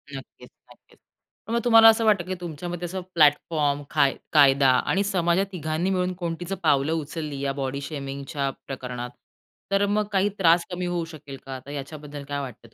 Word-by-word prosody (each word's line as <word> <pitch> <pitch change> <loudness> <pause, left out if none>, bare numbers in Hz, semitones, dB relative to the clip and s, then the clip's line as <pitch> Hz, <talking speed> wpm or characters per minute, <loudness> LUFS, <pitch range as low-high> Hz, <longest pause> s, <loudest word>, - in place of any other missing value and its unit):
नक्कीच, 135 - -11 0.2
नक्कीच. - - -22 0.5
पण 230 - -3
मग 235 - +2
तुम्हाला 225 -1 +8
असं 225 0 +3
वाटतं 200 -5 +3
की 185 0 -3
तुमच्यामध्ये 175 +1 -5
असं 185 +2 -4
प्लॅटफॉर्म, 145 -2 +2
काय 140 -3 +3 0.2
कायदा 140 -2 +6 0.2
आणि 195 +2 +1
समाजात 185 -1 +1
तिघांनी 160 0 -2
मिळून 185 -1 0
कोणतीच 170 +2 -3
पावलं 145 -1 +3
उचलली, 155 -2 -4
या 140 -1 -1
बॉडी 135 +1 -3
शेमिंगच्या 140 -1 -4 0.2
प्रकरणात, 125 -2 -5 0.6
तर 195 +1 +3
मग 210 +1 +1
काही 195 +1 +2
त्रास 170 -1 +4
कमी 180 0 -3
होऊ 175 -1 -2
शकेल 150 -4 -10
का, 135 -1 -6
तर 140 - -9
याच्याबद्दल 145 0 -7
काय 145 0 -2
वाटतं 115 -3 -10
155 Hz, 170 wpm, -25 LUFS, 140-180 Hz, 0.6 s, तुम्हाला